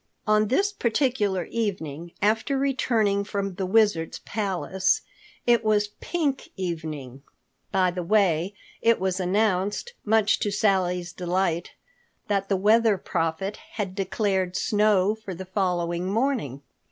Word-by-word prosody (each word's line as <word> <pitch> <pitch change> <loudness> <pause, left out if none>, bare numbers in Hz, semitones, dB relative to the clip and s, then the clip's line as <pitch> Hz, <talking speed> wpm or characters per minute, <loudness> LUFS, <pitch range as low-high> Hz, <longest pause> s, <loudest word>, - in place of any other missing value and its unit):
On 215 0 +3
this 395 - +1
particular 225 - +1
evening 170 -7 -4
after 220 +6 +2
returning 230 -7 +1
from 200 -1 -3
the 185 +1 -3
Wizard's 205 -6 +2
palace,—it 200 +3 -1
was 210 -1 +3
a - - -13
pink 300 -6 -2
evening, 155 -8 -5 0.5
by 185 -2 +3
the 180 0 -4
way—it 200 +4 +1
was 190 0 -1
announced 200 - 0
much 220 -1 +3
to 205 - 0
Sally's 180 -4 +1
delight 175 -1 -1 0.6
that 195 -1 0
the 195 - +2
Weather 215 +2 +4
Prophet 165 +4 -2 0.2
had 200 -4 -3
declared 190 -1 -1
snow 205 -1 +3
for 215 -4 -8
the 190 +2 -7
following 180 -2 -1
morning. 215 - -1
195 Hz, 120 wpm, -25 LUFS, 180-215 Hz, 0.6 s, Weather